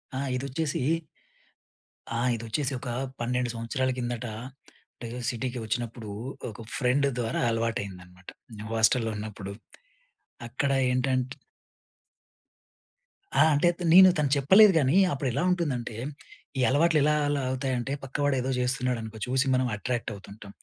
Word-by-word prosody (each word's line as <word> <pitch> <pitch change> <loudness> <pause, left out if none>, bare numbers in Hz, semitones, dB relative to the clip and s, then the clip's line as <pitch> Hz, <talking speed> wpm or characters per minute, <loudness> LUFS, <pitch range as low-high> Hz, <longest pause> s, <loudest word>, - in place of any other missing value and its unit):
ఆ! - - -2 0.2
ఇదొచ్చేసి, 140 +3 -2 1.4
ఆహ్, 125 +1 +1
ఇదొచ్చేసి 115 +5 -2
ఒక - - -7 0.3
12 125 +1 -1
సంవత్సరాల 115 +3 -1
కిందట, 120 0 -3 0.7
అంటే 120 - -8 0.2
సిటీకి 125 0 -3
వచ్చినప్పుడు 115 -1 -4 0.4
ఒక 110 - -11 0.2
ఫ్రెండ్ 140 +1 +2
ద్వారా 115 -2 -1
అలవాటయిందనమాట. 95 -5 -4 0.3
నే 105 - -7
హాస్టల్‌లో 115 +1 +3
ఉన్నప్పుడు. 105 -2 -6 1.0
అక్కడ 140 +4 -1 0.2
ఏంటంట్ 130 0 0 2.0
ఆ! - - +5
అంటే 165 +5 +4
త్ - - -10
నేను, 185 +1 +10
తను 150 -2 +1
చెప్పలేదు 190 +9 +7
కానీ, 140 +5 +3 0.2
అప్పుడు 135 -1 -2
ఎలా 140 - 0
ఉంటుందంటే, 135 -11 -2 0.6
ఈ - - +2
అలవాట్లు 155 +3 +3
ఎలా, 150 +1 +3
అలా 145 -1 0
అవుతాయి 130 0 -1
అంటే, 135 +3 -3
పక్కవాడు 145 +1 0
ఏదో 130 - -2
చేస్తున్నాడు 125 -1 0
అనుకో, 110 0 -8
చూసి 130 +2 +1
మనం 130 - +2
అట్రాక్ట్‌వుతుంటాం. 105 -3 -5
125 Hz, 125 wpm, -27 LUFS, 115-140 Hz, 2.0 s, నేను